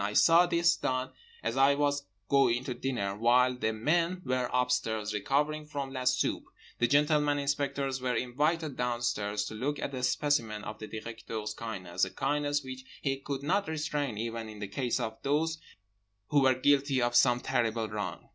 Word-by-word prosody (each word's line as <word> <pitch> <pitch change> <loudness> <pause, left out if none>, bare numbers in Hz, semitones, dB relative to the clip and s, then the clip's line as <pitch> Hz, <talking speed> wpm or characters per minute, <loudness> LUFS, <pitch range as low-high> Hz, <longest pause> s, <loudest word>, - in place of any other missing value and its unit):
I 105 +1 -2
saw 170 +8 +6
this 170 0 +3
done 130 -3 -2 0.3
as - - -1
I 135 +1 +5
was 145 0 0 0.2
going 130 -3 +3
to 130 - -3
dinner. 120 -6 -2
While 125 +3 +4
the 110 -3 0
men 170 +10 0
were 130 -1 0
upstairs 110 -4 0
recovering 150 +8 0
from 140 -3 -5
la 130 -1 -4
soupe, 130 0 +1 0.3
the 120 - +3
gentleman 150 +1 +3
inspectors 140 -2 -1
were 125 -1 0
invited 145 +5 0
downstairs 120 -4 -1
to 110 - -6
look 135 +7 -2
at 140 - -4
a 130 - -3
specimen 125 -4 0
of 105 +1 -7
the 110 - -7
Directeur's 110 -1 -6
kindness—a 100 -6 -3
kindness 145 0 0
which 130 0 -8 0.2
he 135 -1 0
could 140 0 -5
not 195 +7 +1
restrain 150 -6 -2
even 115 0 -4
in 105 - -10
the 105 -1 -5
case 125 +4 -1
of 110 0 -4
those 160 +3 0 0.7
who 145 - +4
were 130 -1 +4
guilty 140 0 +3
of 120 0 +1
some 125 0 +5
terrible 115 -2 0
wrong. 105 -4 -5
130 Hz, 175 wpm, -30 LUFS, 115-145 Hz, 0.7 s, saw